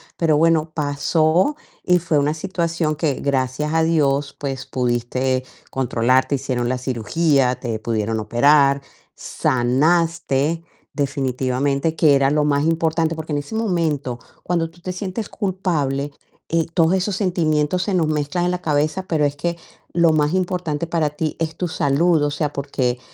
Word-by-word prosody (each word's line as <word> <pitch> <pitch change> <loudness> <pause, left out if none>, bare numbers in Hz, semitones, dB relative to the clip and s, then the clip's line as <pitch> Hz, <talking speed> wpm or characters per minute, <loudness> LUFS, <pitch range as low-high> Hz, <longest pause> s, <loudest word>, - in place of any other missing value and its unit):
pero 160 -3 +2
bueno, 160 0 +2
pasó 155 - +1 0.3
y 180 -1 +3
fue 165 -3 0
una 145 +1 +1
situación 165 -3 -1
que 145 -1 0
gracias 140 +2 -1
a 165 - +3
Dios, 145 -4 +1
pues, 135 -2 -4
pudiste 125 +1 -1 0.3
controlar, 130 0 +2
te 140 - 0
hicieron 125 -3 -2
la 130 - 0
cirugía, 130 +2 +1
te 115 -4 -3
pudieron 110 -1 -1
operar, 140 +5 +4 0.3
sanaste 155 +4 +1 0.3
definitivamente, 140 +2 -1
que 150 -4 +5
era 135 0 +3
lo 150 0 +2
más 145 0 +1
importante, 165 0 +1
porque 160 -1 -7
en 145 - 0
ese 145 +9 -7
momento 160 - -1 0.2
cuando 170 -2 0
tú 170 +1 -22
te 185 - -4
sientes 195 +3 -4
culpable, 155 -8 -1 0.4
eh, 165 -1 +1
todos 165 +1 +3
esos 190 +1 0
sentimientos 175 -3 +1
se 200 - -2
nos 165 -4 +2
mezclan 155 +3 -1
en 180 - +1
la 180 - -3
cabeza, 155 +3 0
pero 155 -3 +1
es 145 0 -1
que 170 +3 -2 0.4
lo 170 -1 +4
más 150 +1 +2
importante 175 -4 -1
para 160 -3 0
ti 155 +1 -3
es 165 0 -2
tu 180 - -1
salud. 160 +1 +2
O 145 - 0
sea, 145 0 -2
porque, 130 -3 -1
150 Hz, 160 wpm, -21 LUFS, 135-165 Hz, 0.4 s, que